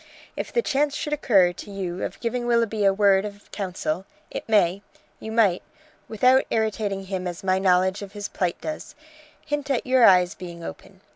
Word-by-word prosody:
If - - -5
the 475 - +1
chance 285 +1 +1
should 300 - -3
occur 195 -11 +3
to 180 - -10
you 190 -2 -4
of - - -5
giving 240 +1 -2
Willoughby 230 -3 +1
a 195 - +6
word 195 -1 +3
of 205 -1 -9
counsel 185 -2 -3 0.2
it - - -6
may 195 -3 +3 0.4
you 220 - -7
might, 210 -6 +3 0.5
without 255 +4 +4
irritating 215 -3 -1
him 185 -1 -3
as 175 0 -6
my 190 0 +2
knowledge 185 +1 +2
of 200 -1 -9
his 205 -1 -5
plight 180 -2 -2
does, 310 -1 -6 0.5
hint 295 -2 -3
at 265 -4 0
your 255 -1 +4
eyes 180 -4 +6
being 170 -2 -9
open. 80 - -10
200 Hz, 185 wpm, -24 LUFS, 185-235 Hz, 0.5 s, a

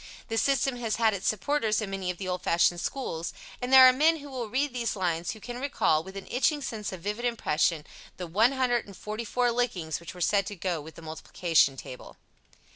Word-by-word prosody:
This 225 0 +1
system 270 -2 +1
has 230 -3 -1
had 225 -2 +3
its 195 -1 -3
supporters 215 +1 +1
in 210 -3 -4
many 190 -2 -3
of 180 - -3
the 190 - -5
old 180 -1 -2
fashioned 175 0 +2
schools, 170 -12 -4 0.3
and 250 +1 -3
there 260 -1 +10
are 255 - +6
men 315 +5 +3
who 285 -2 -10
will 245 -4 -4
read 270 +3 0
these 235 -3 -2
lines 175 -3 -1
who 220 - -12
can 245 +3 -7
recall, 160 - +1
with 190 +2 -9
an 195 - -7
itching 290 +3 +1
sense 215 -5 -4
of 185 -3 -8
vivid 210 +5 -3
impression, 165 -9 0 0.3
the 180 - -5
144 235 +2 0
lickings 200 -10 -1
which 170 +1 -10
were - - -10
said 200 +2 +2
to 205 - -5
go 175 -3 -2
with 160 +2 -12
the 165 - -12
multiplication 160 -2 +1
table. 125 - -10
210 Hz, 205 wpm, -28 LUFS, 175-245 Hz, 0.3 s, there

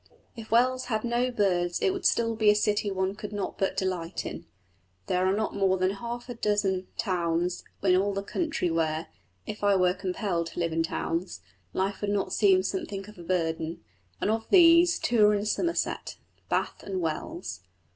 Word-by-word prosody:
If 225 -2 -9
Wells 255 +3 +3
had 220 -3 -1
no 240 +1 +1
birds 180 -7 +1
it 385 - +2
would 385 - +2
still 230 -1 +1
be 215 -1 +4
a 210 - +6
city 210 0 +1
one 190 0 -1
could 210 0 -7
not 205 -2 -4
but 195 - 0
delight 185 -2 -2
in. - - -7 0.6
There 180 0 +1
are 190 - +2
not 215 0 -1
more 190 -1 +2
than 185 +1 +1
half 235 +4 -6
a 245 - -5
dozen 205 -4 0
towns 175 -3 -1 0.2
in 185 -2 +5
all 195 +2 +2
the 195 0 -3
country 310 - -1
where 160 -1 -1 0.4
(if 210 - -7
I 200 -1 +4
were 180 -1 +3
compelled 180 -2 -2
to - - -7
live 165 -1 0
in 165 - +1
towns) 165 +2 -3 0.3
life 195 +1 -2
would 205 - -1
not 205 -1 -1
seem 190 -3 +4
something 195 0 -4
of 210 -3 -13
a - - -8
burden; 165 -1 -2 0.4
and 210 - +1
of 225 0 -2
these, 340 -2 +7
two 235 -3 +2
are 210 - +4
in 205 0 -1
Somerset 335 +10 -1 0.3
Bath - - -1
and 190 -2 -4
Wells. 165 - -4
195 Hz, 190 wpm, -28 LUFS, 180-220 Hz, 0.6 s, these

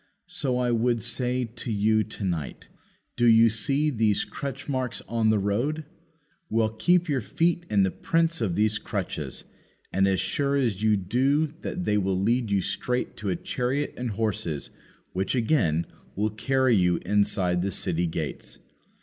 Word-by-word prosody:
so 150 -8 -2
I 125 -1 +1
would 115 -1 +1
say 125 0 0
to 115 +1 -6
you 110 +1 +3
to 110 -1 -7
night, 85 -7 -3 0.5
"Do 120 0 +3
you 115 0 +7
see 140 +6 +1
these 110 -5 +1
crutch 140 -1 -6
marks 130 -3 -2
on 115 -1 +1
the 110 - +4
road?" 120 +11 -1 0.6
Well, 110 -1 +2
keep 175 +11 +2
your 140 -4 0
feet 170 - 0
in 100 -2 +3
the 95 - +1
prints 165 -2 0
of 95 -7 0
these 105 0 +2
crutches, - - -4 0.5
and 95 +1 +3
as 95 -1 +2
sure 140 +9 0
as 115 -8 0
you 110 -1 +3
do 130 - +2 0.2
that 180 - -4
they 105 0 +2
will 95 -1 0
lead 115 +3 +1
you 100 -1 +2
straight 125 +6 -2
to 105 - -3
a 90 - +1
chariot 130 +9 -2
and 125 -1 -3
horses, 100 -8 -2 0.4
which, 95 +6 -1
again, 100 - +2 0.3
will 105 +2 0
carry 130 +2 +2
you 90 -3 +3
inside 95 -3 +1
the 95 - 0
city 90 -2 0
gates. 80 -2 -5
110 Hz, 165 wpm, -26 LUFS, 100-130 Hz, 0.6 s, you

